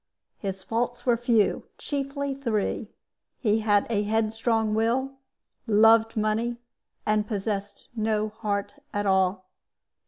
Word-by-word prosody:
His 195 -2 -4
faults 240 +3 -2
were 245 -2 +4
few, 235 -3 +3
and - - -9
chiefly 280 0 -3
three 225 -5 -2 0.5
he 215 -2 +2
had 205 -2 +3
a 215 -3 +1
headstrong 220 +1 +1
will, 235 +5 +1 0.6
loved 225 +1 +5
money, 220 +3 0 0.5
and 210 0 +1
possessed 205 -1 -3
no 215 -1 0
heart 215 +4 -3 0.2
at 205 0 0
all. 190 -1 +2
220 Hz, 120 wpm, -26 LUFS, 210-235 Hz, 0.6 s, loved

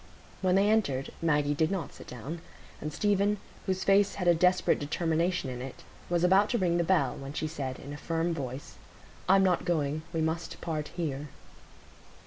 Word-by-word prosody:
When 185 -1 +3
they 195 +1 +4
entered, 165 -12 +1
Maggie 150 -3 +2
did 155 +2 +1
not 185 -7 -3
sit - - -12
down, 140 +8 -6 0.4
and 150 - -3
Stephen, 205 +3 +2 0.3
whose 190 0 0
face 200 0 +4
had 180 -3 -2
a 175 - +7
desperate 180 +2 +3
determination 165 +2 0
in 125 -1 -6
it, 130 0 -8 0.3
was 175 0 +1
about 190 +3 +5
to 240 - +1
ring 175 -4 +2
the - - +3
bell, 160 -7 +2
when 135 +1 -7
she 155 - -2
said, 135 -5 -4
in 140 +1 -8
a - - -6
firm 165 +2 -1
voice,— 135 -3 -6 0.5
"I'm 195 0 +6
not 185 -2 +2
going; 155 -3 0
we 165 -2 -1
must 160 +1 -2
part 155 -3 -3
here." 150 -4 -3
165 Hz, 185 wpm, -29 LUFS, 145-185 Hz, 0.5 s, a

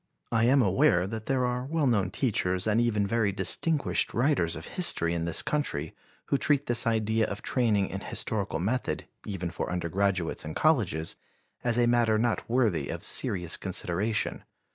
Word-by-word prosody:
I 115 0 +3
am 130 +1 +4
aware 90 -2 +3
that 110 +2 -6
there 130 -2 +1
are 125 0 -2
well 155 +2 -1
known 105 -8 +2
teachers 95 -6 0
and 110 +1 +2
even 105 -4 +1
very 105 0 +1
distinguished 150 - +1
writers 120 - +1
of 80 - -8
history 85 - +1
in 85 -1 -2
this 85 -1 +1
country 110 - -2 0.3
who 140 - 0
treat 145 -1 +2
this 120 -1 0
idea 110 -1 +1
of 100 - -6
training 110 -6 +1
in 95 - -4
historical 100 -3 -2
method, 110 +10 -2 0.2
even 90 -4 -4
for - - -4
undergraduates 90 0 -1
in 80 0 -6
colleges, 100 - +1 0.5
as 120 -1 0
a 120 - +4
matter 120 -2 +3
not 115 0 -1
worthy 110 - +1
of - - -5
serious 90 -3 +1
consideration. 95 +3 -2
110 Hz, 165 wpm, -28 LUFS, 90-120 Hz, 0.5 s, am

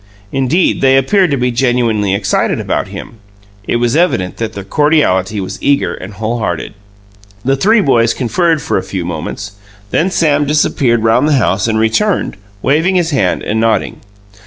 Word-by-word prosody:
Indeed, 135 +7 +1
they 135 0 +4
appeared 185 +7 +2
to 140 - 0
be 125 0 0
genuinely 115 -5 +1
excited 100 -1 0
about - - -2
him 115 - -9 0.5
it - - 0
was 120 +1 +1
evident 155 - 0
that 115 -1 -4
their 100 - -7
cordiality 105 - +1
was 95 - -6
eager 140 0 +1
and 100 +2 -9
wholehearted. 110 -5 -3 0.7
The 135 +1 +2
three 215 - +3
boys 115 - +2
conferred 155 +6 0
for - - 0
a - - -3
few 95 -2 -5
moments; 90 +5 -5 0.4
then 180 - +1
Sam 150 -5 +1
disappeared 130 -6 +1
round 115 +5 +3
the 155 - +2
house 100 -6 +1
and 110 -1 0
returned, 110 - 0 0.3
waving 160 +8 +2
his 175 -2 +1
hand 115 -11 0
and 110 +1 -1
nodding. 115 0 0
120 Hz, 165 wpm, -14 LUFS, 105-150 Hz, 0.7 s, they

